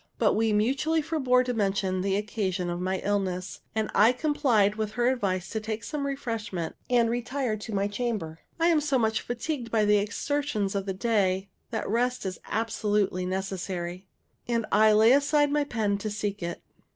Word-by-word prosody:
But - - +3
we 225 0 +2
mutually 270 +9 +1
forbore 260 -5 +2
to 250 - -1
mention 195 -3 0
the 195 0 0
occasion 200 -4 -2
of 175 +1 -3
my 190 +1 0
illness; 190 -2 -2
and 220 -1 -1
I 220 +3 +6
complied 250 -8 +2
with 215 -1 -3
her 240 0 +1
advice 195 -8 -1
to 220 - -1
take 220 +1 -4
some 290 -2 -3
refreshment, 225 -10 -4
and 240 -2 +4
retire 245 0 -1
to 215 +2 -7
my 200 +1 +1
chamber. 205 -7 -3 0.2
I 335 +1 +4
am 320 -3 +4
so 285 -2 +1
much 220 -2 +1
fatigued 245 +1 -4
by 220 -2 +2
the 210 0 +5
exertions 215 -1 -1
of 200 -1 -2
the 190 - -2
day 195 -3 +1 0.2
that - - -3
rest 245 +2 0
is 185 -1 -4
absolutely 210 -4 0
necessary; 185 -1 -4 0.4
and 230 -2 0
I 215 +1 +6
lay 220 +2 +6
aside 285 +1 +3
my 295 0 +2
pen 210 -6 -1
to 215 - -3
seek 205 -1 -3
it. 170 0 -5
215 Hz, 180 wpm, -27 LUFS, 195-245 Hz, 0.4 s, I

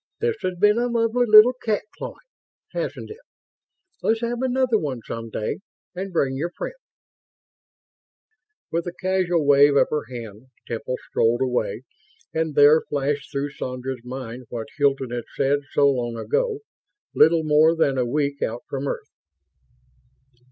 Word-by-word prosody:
This 460 -1 0
has 185 -1 -2
been 210 +3 +4
a 245 - +1
lovely 235 +1 +1
little 215 +3 +8
cat 215 -2 0
clawing, - - -6 0.6
hasn't - - -4
it? 435 - -10 0.8
Let's 225 +1 +1
have 235 +1 -2
another 255 -3 +2
one 135 -6 -4
some 115 0 -6
day, 110 - -3 0.3
and 190 +1 -5
bring 135 -6 0
your 160 +6 -2
friends." 175 - -6 2.0
With 170 +1 -1
a 175 - -4
casual 185 -4 +1
wave 140 0 +6
of - - +4
her 150 -4 -1
hand, 115 -1 -9 0.2
Temple 115 +2 -3
strolled 115 +2 +1
away; 125 -1 -1 0.5
and 160 -2 -1
there, 145 +2 +7
flashed 145 0 -2
through 140 0 -2
Sandra's 130 -2 -5
mind 125 -1 -7
what 115 -2 -6
Hilton 135 -3 +1
had 120 -1 -4
said 140 +1 +2
so 140 - +4
long 120 -3 -3
ago, 440 - -1 0.5
little 160 +1 +5
more 155 +2 +4
than 140 -5 +1
a - - +3
week 140 +3 -1
out 115 +2 -2
from 140 0 -4
Earth - - -5
145 Hz, 150 wpm, -23 LUFS, 130-190 Hz, 2.0 s, little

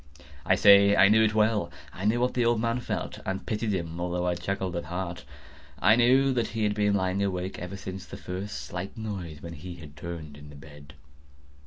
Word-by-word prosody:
I - - +5
say 100 0 +7
I 100 - +6
knew 110 +1 +5
it 110 -1 +1
well. 105 -4 +2 0.2
I 95 - -6
knew 110 +3 +2
what 125 - +1
the 125 - +1
old 120 -1 +2
man 115 +2 0
felt, - - -4
and 95 0 -4
pitied 110 -1 -1
him, 85 -3 -3
although 90 0 -1
I 90 - +1
chuckled 90 +1 -3
at 85 - -3
heart. 85 +1 -5 0.5
I 105 +9 +5
knew 130 +3 +4
that 120 -3 0
he 115 -1 -3
had 105 -1 +2
been 105 -1 +1
lying 95 0 0
awake 95 -1 -2
ever 90 +3 -6
since 95 0 -7
the - - -8
first 95 +3 -5
slight 90 +6 -6
noise, 95 -9 -6
when 85 0 -7
he 85 +3 -8
had 75 -3 -12
turned 80 -2 -7
in 75 0 -12
the 75 - -12
bed. 70 0 -14
95 Hz, 215 wpm, -27 LUFS, 85-110 Hz, 0.5 s, say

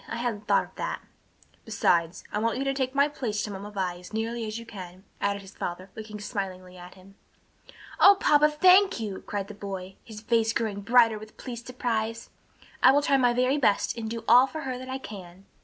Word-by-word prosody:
I - - -5
hadn't 230 -3 -3
thought - - +4
of - - -16
that." - - -3 0.6
"Besides, 175 -6 +1
I 210 - -1
want 230 +2 0
you 270 - -1
to 275 0 0
take 265 -1 -2
my 280 +1 +4
place 235 -8 -3
to 210 - -4
Mamma 200 +1 -7
Vi 185 -4 -3
as 180 +4 -13
nearly 225 +1 -2
as 215 +1 -4
you 230 - -8
can," 185 -4 -10 0.2
added 200 0 -1
his 195 +1 -13
father, 185 +2 -6
looking 215 -1 -8
smilingly 190 -4 -5
at 180 0 -12
him. 190 +1 -17 0.9
"O 400 0 +8
papa, 300 -3 +5
thank 370 +3 +5
you!" 205 -4 -5
cried 200 -1 -3
the 210 - -9
boy, 195 -2 -7
his 215 -2 -10
face 225 0 +1
growing 215 -4 -2
bright 230 0 +4
with 215 0 -13
pleased 240 -2 -8
surprise. 230 -2 -3 0.5
"I 260 - +8
will 285 +2 +3
try 275 - +3
my 245 -2 +3
very 255 +4 +2
best 210 -7 +2
and 225 -2 -5
do 230 0 -5
all 250 +3 +7
for 315 +3 -6
her 255 -2 -4
that 255 0 -9
I 260 - -3
can." 195 -6 -11
220 Hz, 215 wpm, -27 LUFS, 200-250 Hz, 0.9 s, O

